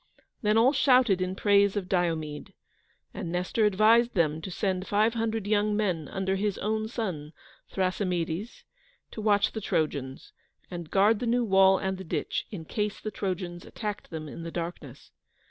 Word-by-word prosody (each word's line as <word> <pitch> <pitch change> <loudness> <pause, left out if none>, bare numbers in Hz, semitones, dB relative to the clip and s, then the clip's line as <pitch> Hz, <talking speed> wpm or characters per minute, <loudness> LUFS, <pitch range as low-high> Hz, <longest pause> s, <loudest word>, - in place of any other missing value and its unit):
Then 210 0 +2
all 245 +5 +5
shouted 255 -8 +4
in 185 0 -2
praise 200 0 +3
of 190 -3 -3
Diomede, 165 -5 -2 0.6
and 165 - -5
Nestor 180 +5 0
advised 220 +4 +4
them 160 -3 +1
to 190 - -6
send 185 0 -2
five 215 +2 +2
hundred 225 -2 -2
young 210 0 +1
men, 180 -8 -1
under 190 0 -1
his 205 0 -1
own 220 +1 -1
son, 180 -10 -4 0.4
Thrasymedes, 185 +1 -2 0.5
to 220 - -6
watch 205 -1 +3
the 220 - -5
Trojans, 140 -7 -2 0.4
and 170 -3 -6
guard 205 +2 +4
the 245 - -2
new 240 +1 +2
wall 190 -1 +5
and 190 0 -3
the - - -6
ditch, 165 - -3
in 170 -7 -7
case 210 +4 -2
the 215 - -5
Trojans 180 -3 -4
attacked 210 -2 -6
them 160 -2 -6
in 150 - -8
the 165 - -5
darkness. 165 -6 -7
195 Hz, 165 wpm, -28 LUFS, 175-215 Hz, 0.6 s, all